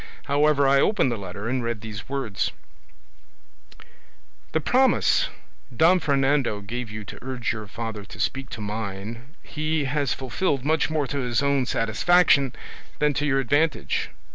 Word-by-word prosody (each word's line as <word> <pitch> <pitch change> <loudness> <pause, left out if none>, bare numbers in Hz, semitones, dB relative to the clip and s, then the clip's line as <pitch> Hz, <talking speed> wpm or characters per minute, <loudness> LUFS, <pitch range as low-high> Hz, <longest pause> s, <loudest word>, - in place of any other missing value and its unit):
However, 145 0 +3
I 135 0 +5
opened 205 - +2
the - - 0
letter 100 +1 -6
and 125 0 -1
read 115 -2 -3
these 110 -1 -8
words: 135 -8 -2 2.0
"'The 160 - 0
promise 260 - +3 0.5
Don 175 +7 +5
Fernando 135 -6 +1
gave 115 +3 -5
you 105 0 -7
to - - -9
urge 130 -3 -2
your 110 -2 -7
father 110 0 -5
to - - -12
speak 135 -1 -2
to 110 - -7
mine, 110 - -6
he 155 0 -1
has 140 0 0
fulfilled 135 +1 -1
much 155 +1 +2
more 155 -2 0
to 140 +2 -3
his 125 +1 0
own 140 -2 +2
satisfaction 140 +4 +3 0.5
than 150 0 +2
to 150 +1 0
your 135 -1 +2
advantage. 145 +4 +1
135 Hz, 150 wpm, -24 LUFS, 115-145 Hz, 2.0 s, I